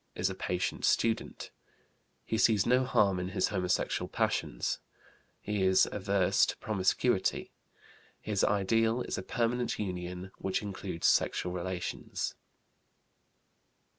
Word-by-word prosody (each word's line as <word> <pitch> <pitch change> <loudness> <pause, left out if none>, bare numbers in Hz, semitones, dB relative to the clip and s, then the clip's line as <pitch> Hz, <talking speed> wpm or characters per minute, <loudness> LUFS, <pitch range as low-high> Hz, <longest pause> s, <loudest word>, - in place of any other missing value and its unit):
Is 95 +2 0
a - - -3
patient 90 -1 -2
student. 115 -1 0 0.7
He 110 - -1
sees 105 -4 +4
no 130 +1 +3
harm 100 -6 +2
in 90 - -3
his - - +2
homosexual 90 -3 -1
passions. - - -1 0.6
He 105 -1 -2
is 95 0 +4
averse 100 -2 +2
to - - -3
promiscuity. 100 +1 0 0.7
His 105 -2 -1
ideal 115 +4 +2
is - - -3
a - - -3
permanent 120 +3 -1
union 90 -1 -5
which 95 +2 -1
includes 95 -4 -5
sexual 90 - +2
relations. 90 0 -4
95 Hz, 115 wpm, -31 LUFS, 90-110 Hz, 0.7 s, sees